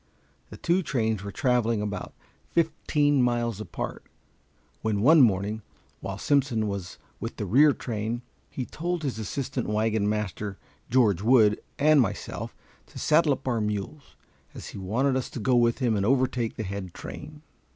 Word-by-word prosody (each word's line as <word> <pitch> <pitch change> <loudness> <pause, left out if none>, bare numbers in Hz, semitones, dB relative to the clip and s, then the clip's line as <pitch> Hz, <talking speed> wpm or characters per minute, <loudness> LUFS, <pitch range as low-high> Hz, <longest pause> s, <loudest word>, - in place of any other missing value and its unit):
The - - -10
two 175 +2 +1
trains 110 - -1
were 100 - -5
traveling 120 -4 +1
about 105 0 -4 0.3
fifteen 150 -4 +2
miles 120 -3 0
apart, 90 -4 -5 0.8
when 105 -2 0
one 155 +4 +7
morning, 105 -1 +2 0.4
while 95 -1 -5
Simpson 125 -4 +1
was 100 -3 -5 0.2
with - - -5
the - - -3
rear 140 +10 +6
train, 115 -1 -3 0.3
he 130 - -4
told 175 +3 -3
his 130 -6 -2
assistant 125 +3 -3
wagon 105 -1 +1
master 105 -1 -3 0.3
George 110 -7 +3
Wood 110 -2 +4 0.2
and 150 0 +5
myself 105 -3 -3 0.3
to - - -13
saddle 155 -1 +4
up 135 0 -7
our 120 -3 +1
mules, 105 +7 -4 0.4
as - - -8
he - - -8
wanted 125 +9 +1
us 130 - -2
to - - -6
go 125 +3 +2
with 120 -1 +3
him 120 -5 +1
and 100 - 0
overtake 125 -1 +1
the 110 - -4
head 95 -2 -6
train. 150 0 -9
115 Hz, 160 wpm, -27 LUFS, 105-135 Hz, 0.8 s, one